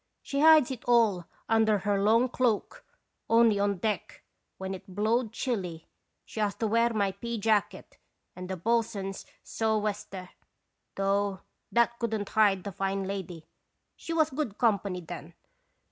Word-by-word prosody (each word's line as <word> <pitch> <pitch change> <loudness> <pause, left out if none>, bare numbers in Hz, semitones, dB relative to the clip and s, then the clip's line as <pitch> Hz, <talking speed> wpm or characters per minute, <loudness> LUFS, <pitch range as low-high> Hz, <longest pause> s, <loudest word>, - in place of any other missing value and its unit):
She 280 - -3
hides 310 -3 +6
it 250 -2 -6
all 225 -7 +3 0.2
under 220 -1 +3
her 200 0 0
long 225 +5 +4
cloak, 245 -4 -1 0.5
only 230 -2 +5
on 200 -1 +1
deck, 210 +3 -3 0.3
when 190 0 -4
it 190 0 -10
blowed 220 +2 +1
chilly, 190 -10 -3 0.4
she - - -8
has 205 -2 0
to 225 - -2
wear 230 +2 +2
my 200 -3 +1
pea 235 +4 -5
jacket 215 -1 -1 0.4
and 180 0 -8
the 190 - -3
bo'sun's 215 -1 -1 0.2
sou'wester; 210 -4 -2 0.6
though 195 0 0 0.3
that 235 0 +2
couldn't 220 -3 -2
hide 200 -4 +3
the 200 - -5
fine 195 +1 -2
lady. 185 -4 -5 0.5
She - - -8
was 315 -2 +2
good 260 -7 -3
company 200 -5 +1
then. 165 - -9
210 Hz, 145 wpm, -28 LUFS, 195-230 Hz, 0.6 s, hides